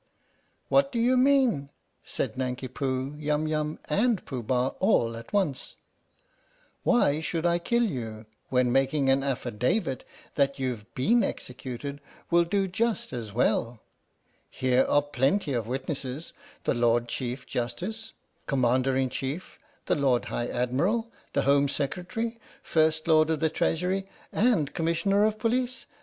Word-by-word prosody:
"What 275 Hz, 0 st, +3 dB
do 240 Hz, -, -3 dB
'you 245 Hz, +3 st, +4 dB
mean?" 255 Hz, -, +3 dB, 0.3 s
said -, -, -3 dB
Nanki 130 Hz, 0 st, -3 dB
Poo, 130 Hz, +1 st, -2 dB
Yum 150 Hz, 0 st, 0 dB
Yum, 155 Hz, 0 st, -1 dB
and 210 Hz, +5 st, +1 dB
Pooh 130 Hz, -4 st, -4 dB
Bah 125 Hz, +3 st, +1 dB
all 115 Hz, -1 st, +2 dB
at 115 Hz, 0 st, -10 dB
once. 190 Hz, -10 st, -1 dB, 0.5 s
" -, -, -37 dB
Why 195 Hz, -, +3 dB
should 160 Hz, +1 st, -2 dB
I 170 Hz, 0 st, +3 dB
kill 235 Hz, +7 st, +1 dB
you 115 Hz, -, -4 dB, 0.2 s
when 125 Hz, -1 st, +2 dB
making 135 Hz, +1 st, +2 dB
an 135 Hz, +1 st, +3 dB
affidavit 130 Hz, -, -1 dB, 0.3 s
that 140 Hz, -1 st, +1 dB
you've 125 Hz, -5 st, -3 dB
been 230 Hz, -, +3 dB
executed 130 Hz, +3 st, -5 dB, 0.3 s
will 170 Hz, 0 st, +5 dB
do 195 Hz, +2 st, +1 dB
just 220 Hz, -, -1 dB
as 115 Hz, -4 st, -5 dB
well? 115 Hz, +1 st, +1 dB, 0.7 s
Here 130 Hz, 0 st, +2 dB
are 145 Hz, -, +3 dB
plenty 145 Hz, +4 st, +1 dB
of 115 Hz, -3 st, -1 dB
witnesses 135 Hz, +3 st, -4 dB, 0.3 s
the -, -, +1 dB
Lord 120 Hz, -1 st, +2 dB
Chief 125 Hz, +1 st, -4 dB
Justice, 180 Hz, -, -4 dB, 0.3 s
Commander 130 Hz, 0 st, +2 dB
in 130 Hz, -1 st, +1 dB
Chief, 140 Hz, +7 st, -5 dB, 0.3 s
the -, -, +2 dB
Lord 135 Hz, -4 st, +2 dB
High 120 Hz, -, -2 dB
Admiral, 170 Hz, -, 0 dB, 0.2 s
the -, -, +2 dB
Home 140 Hz, +1 st, +4 dB
Secretary, 185 Hz, +12 st, -3 dB, 0.2 s
First 155 Hz, 0 st, +2 dB
Lord 155 Hz, -1 st, +5 dB
of 160 Hz, -2 st, +1 dB
the 160 Hz, 0 st, +1 dB
Treasury, 185 Hz, +5 st, 0 dB, 0.2 s
and 205 Hz, -, +2 dB
Commissioner 185 Hz, +5 st, +2 dB
of 215 Hz, 0 st, 0 dB
Police. 245 Hz, +3 st, -1 dB
145 Hz, 145 wpm, -27 LUFS, 130-190 Hz, 0.7 s, will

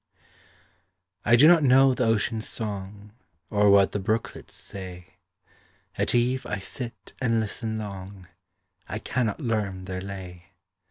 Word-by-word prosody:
I 120 Hz, -, +5 dB
do 140 Hz, +6 st, +7 dB
not 170 Hz, -1 st, +7 dB
know 135 Hz, -1 st, +5 dB
the 125 Hz, -, 0 dB
ocean’s 110 Hz, 0 st, 0 dB
song, 100 Hz, -1 st, -1 dB, 0.4 s
Or 105 Hz, -1 st, +4 dB
what 100 Hz, -1 st, +5 dB
the 105 Hz, -, -2 dB
brooklets 110 Hz, +3 st, -3 dB
say; 90 Hz, -2 st, -9 dB, 0.8 s
At -, -, 0 dB
eve 125 Hz, +2 st, +1 dB
I -, -, -2 dB
sit 115 Hz, +5 st, -8 dB
and 115 Hz, -3 st, +2 dB
listen 110 Hz, +1 st, -3 dB
long, 100 Hz, -3 st, -8 dB, 0.6 s
I -, -, -3 dB
cannot 120 Hz, -5 st, -2 dB
learn 105 Hz, -7 st, -2 dB
their 95 Hz, 0 st, -5 dB
lay. 95 Hz, -3 st, -9 dB
105 Hz, 130 wpm, -26 LUFS, 95-120 Hz, 0.8 s, do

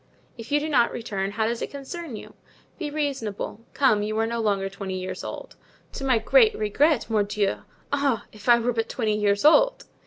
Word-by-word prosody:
"If 230 Hz, +2 st, -10 dB
you 295 Hz, -, +4 dB
do 300 Hz, -, -3 dB
not 255 Hz, -6 st, +3 dB
return, 200 Hz, -4 st, -3 dB
how 220 Hz, +1 st, 0 dB
does 235 Hz, +1 st, -2 dB
it -, -, -3 dB
concern 280 Hz, 0 st, -7 dB
you? -, -, -10 dB, 0.5 s
Be 310 Hz, -4 st, -3 dB
reasonable. 270 Hz, -8 st, -3 dB
Come, 240 Hz, -7 st, +3 dB
you 215 Hz, +1 st, -2 dB
are 225 Hz, -, +2 dB
no 235 Hz, +1 st, -2 dB
longer 200 Hz, -3 st, 0 dB
twenty 195 Hz, -1 st, -5 dB
years 185 Hz, 0 st, -5 dB
old." -, -, -7 dB, 0.4 s
"To -, -, -6 dB
my 260 Hz, -3 st, +3 dB
great 440 Hz, -, +4 dB
regret, 265 Hz, +7 st, +2 dB
mordieu! 210 Hz, -2 st, 0 dB, 0.4 s
Ah, 280 Hz, -5 st, +1 dB
if 215 Hz, +2 st, -7 dB
I 240 Hz, -, +8 dB
were 240 Hz, +1 st, 0 dB
but 225 Hz, 0 st, -2 dB
twenty 220 Hz, -4 st, 0 dB
years 205 Hz, +2 st, +1 dB
old!" -, -, +5 dB
230 Hz, 195 wpm, -25 LUFS, 210-280 Hz, 0.5 s, I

